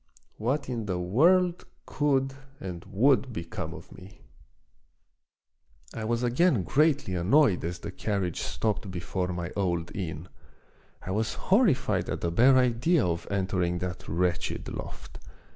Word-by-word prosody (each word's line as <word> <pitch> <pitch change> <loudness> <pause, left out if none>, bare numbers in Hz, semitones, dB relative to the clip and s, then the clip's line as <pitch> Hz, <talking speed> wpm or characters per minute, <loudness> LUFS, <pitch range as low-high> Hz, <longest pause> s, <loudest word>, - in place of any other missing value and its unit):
What 130 +6 -1
in 115 -4 -3
the 90 -2 -1
world 170 - +3 0.2
could 135 -2 +1 0.3
and 90 -3 -6
would 130 +5 +2
become 85 -7 -5
of - - -11
me! 95 +2 -14 1.7
I 110 - -4
was 120 +2 0
again 125 - +3
greatly 145 - +2
annoyed 95 - +3
as 85 +2 -3
the - - -7
carriage 100 -5 -2
stopped 100 - -2
before 90 0 -3
my 90 -1 -4
old 85 -4 -1
inn. 80 -4 -5 0.8
I 95 - -5
was 110 +3 -1
horrified 140 - +2
at - - -3
the 85 - -1
bare 130 +9 +5
idea 125 - +3
of 85 -1 -2
entering 95 -3 0
that 90 0 -5
wretched 90 +2 -1
loft. - - -8
100 Hz, 135 wpm, -28 LUFS, 90-130 Hz, 1.7 s, bare